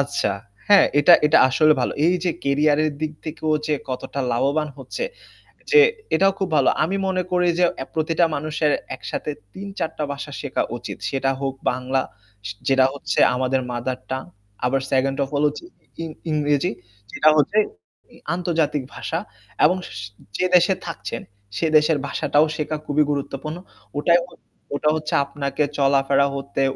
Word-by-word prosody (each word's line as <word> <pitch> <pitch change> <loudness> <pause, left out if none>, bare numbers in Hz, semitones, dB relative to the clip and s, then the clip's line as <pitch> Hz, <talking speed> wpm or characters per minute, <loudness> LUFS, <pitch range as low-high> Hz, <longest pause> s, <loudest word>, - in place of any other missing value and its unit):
আচ্ছা 140 +1 0 0.4
হ্যাঁ, 205 -1 +7
এটা, 145 +5 +7
এটা 150 - +5
আসলে 155 +4 +4
ভালো। 125 - 0
এই 175 - +4
যে 180 - +2
কেরিয়ারের 150 +2 +3
দিক 155 -1 -2
থেকেও 155 0 -2
যে 155 - +1
কতটা 130 +2 -4
লাভবান 140 +6 +1
হচ্ছে, - - -5 0.7
যে 445 - +8 0.4
এটাও 195 +4 +4
খুব 190 -2 -1
ভালো। 140 -3 +4
আমি 180 +5 -1
মনে 185 -1 0
করি 180 0 +2
যে, 180 - +6
অ্যা 130 - -5
প্রতিটা 165 +2 +2
মানুষের 150 +1 0 0.2
একসাথে 150 - -4 0.2
৩-৪ 195 -4 -4
টা 155 - -1
ভাষা 140 +1 -7
শেখা 140 -3 -1
উচিত। 105 -4 -7
সেটা 135 +1 0
হোক 135 -1 -1 0.2
বাংলা 130 +1 -1 0.5
সে 105 - -4
যেটা 135 -1 +5
হচ্ছে 140 - -2 0.2
আমাদের 130 +1 0
মাদার 125 +1 -3
টাং 130 0 -2 0.4
আবার 135 +2 +1
2nd 135 +1 +1
ওফ 135 - -5
হলো 145 +1 +3
যে - - -10 0.4
ইং 165 - -5 0.2
ইংরেজি 145 -2 +1 0.4
যেটা 155 - +4
হচ্ছে 150 +8 +2 0.6
ই - - -16 0.2
আন্তর্জাতিক 165 -5 0
ভাষা, 165 - -3 0.5
এবং 175 +5 +4 0.6
যে - - +1
দেশে 180 +2 +5
থাকছেন - - -5 0.4
সে - - 0
দেশের 155 0 +3
ভাষাটাও 145 +2 +2
শেখা 155 0 -2
খুবই 150 +1 +2
গুরুত্বপূর্ণ। 140 +2 -4 0.4
ওটাই 170 +4 +4 0.6
ওটা 150 +1 +2
হচ্ছে 155 -1 -4
আপনাকে 140 +1 -2
চলাফেরা 140 0 +3
হতে, 140 0 -3
145 Hz, 155 wpm, -22 LUFS, 135-160 Hz, 0.7 s, যে